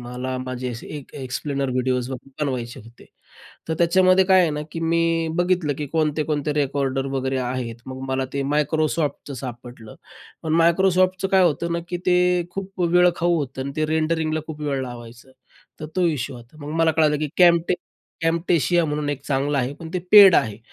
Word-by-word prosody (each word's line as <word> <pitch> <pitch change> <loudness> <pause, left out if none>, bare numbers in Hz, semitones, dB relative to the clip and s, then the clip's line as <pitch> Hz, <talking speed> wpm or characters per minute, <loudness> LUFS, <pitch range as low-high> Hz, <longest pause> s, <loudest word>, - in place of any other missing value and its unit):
मला 125 +1 -5
माझे 130 0 -4
असे 120 -1 -8
एक 140 - -11
अ, - - -7
एक्सप्लेनर 135 +1 -3
व्हिडिओज 125 0 -1
वगैरे 135 +3 -6
बनवायचे 125 -4 -4
होते. 115 +1 -16 0.6
तर 160 - -1
त्याच्यामध्ये 185 +2 +4
काय 190 0 +5
आहे 170 - +2
ना, 150 0 -3
की 165 - -5
मी 165 0 +1
बघितलं, 175 -4 +1
की 150 - -3
कोणते-कोणते 150 -1 -1
रेकॉर्डर 135 -2 -1
वगैरे 130 0 -1
आहेत. 125 -2 -3
मग 130 0 -7
मला 130 0 -1
ते 140 - -1
Microsoftचं 150 -1 -1
सापडलं. 120 -3 -9 0.5
पण 160 0 -1
Microsoftचं 185 +2 +2
काय 190 -1 +5
होतं 170 +1 0
ना, 170 - -1
की 175 - -2
ते 180 -1 +4 0.3
खूप 195 0 -6
वेळ 180 +1 +4
खाऊ 175 0 +1
होतं 135 -4 -3
आणि 140 - -5
ते 155 - 0
रेंडरिंगला 155 0 0
खूप 155 -1 -7
वेळ 140 -3 -1
लावायचं. 120 0 -10 0.5
तर 155 - -5
तो 185 -1 +2
इशू 135 -6 -2
होता. 120 +5 -15
मग 150 - -5
मला 160 - +4
कळालं, 155 -2 +2
की 150 -1 -2
कॅमटे 170 -1 +5 0.5
Camtasia 170 +1 +2
म्हणून 150 -1 -2
एक 140 -1 -3
चांगलं 140 +1 0
आहे, 130 +1 -1
पण 160 +2 -10
ते 180 - 0
पेड 200 -4 +9
आहे 110 -3 +1
150 Hz, 180 wpm, -22 LUFS, 130-170 Hz, 0.6 s, पेड